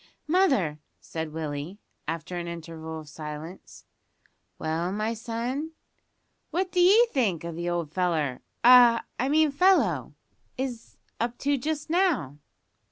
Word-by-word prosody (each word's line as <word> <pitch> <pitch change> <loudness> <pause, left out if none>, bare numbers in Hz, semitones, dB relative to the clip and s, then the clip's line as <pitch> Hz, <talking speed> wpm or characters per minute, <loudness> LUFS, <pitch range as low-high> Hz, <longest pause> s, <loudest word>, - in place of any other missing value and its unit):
"Mother," 275 - +2 0.2
said 160 -1 -5
Willie, 155 +3 -5 0.3
after 165 +2 -4
an 175 -1 -4
interval 160 -1 -7
of 155 - -14
silence. 155 +3 -9 0.7
"Well, 165 +3 -2
my 215 +3 -1
son?" 245 +7 -4 0.8
"What 370 +1 -1
d'ye 380 +6 +6
think 200 - 0
the 170 +1 -4
old 170 -3 -2
feller 160 -8 0 0.2
ah! 240 -1 +8 0.2
I 260 - +1
mean 310 0 +4
fellow 370 +7 +3 0.4
is 250 -3 -5 0.2
up 240 +1 -2
to 285 0 +3
just 295 +3 -3
now?" 300 - +1
200 Hz, 120 wpm, -27 LUFS, -, 0.8 s, ah